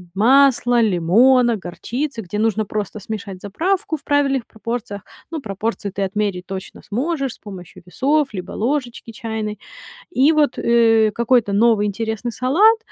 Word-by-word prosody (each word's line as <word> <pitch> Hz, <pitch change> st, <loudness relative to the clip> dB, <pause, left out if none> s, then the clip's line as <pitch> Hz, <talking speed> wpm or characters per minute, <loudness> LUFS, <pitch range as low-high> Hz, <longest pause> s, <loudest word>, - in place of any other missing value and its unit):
масла, 245 Hz, +2 st, +4 dB
лимона, 230 Hz, +5 st, +4 dB
горчицы, 230 Hz, +8 st, -5 dB
где 205 Hz, +1 st, -5 dB
нужно 220 Hz, 0 st, +1 dB
просто 210 Hz, +1 st, -4 dB
смешать 200 Hz, -2 st, -7 dB
заправку 335 Hz, -, -1 dB
в -, -, -25 dB
правильных 275 Hz, -4 st, +1 dB
пропорциях. 220 Hz, -1 st, -5 dB, 0.3 s
Ну, 320 Hz, -3 st, -5 dB
пропорции 210 Hz, -1 st, -3 dB
ты 195 Hz, +1 st, -3 dB
отмерить 195 Hz, -2 st, -2 dB
точно 190 Hz, 0 st, -8 dB
сможешь 275 Hz, +3 st, -2 dB
с -, -, -17 dB
помощью 185 Hz, -5 st, -11 dB
весов 280 Hz, +9 st, +1 dB
либо 185 Hz, -2 st, -7 dB
ложечки 240 Hz, -1 st, -3 dB
чайной. 220 Hz, -3 st, -5 dB, 0.5 s
И 290 Hz, -1 st, +4 dB
вот, 300 Hz, -4 st, +1 dB
э, 225 Hz, -2 st, +3 dB
какой-то 235 Hz, -3 st, +2 dB
новый 215 Hz, 0 st, +3 dB
интересный 220 Hz, +3 st, -3 dB
салат, 380 Hz, -, +4 dB
225 Hz, 140 wpm, -20 LUFS, 205-265 Hz, 0.5 s, масла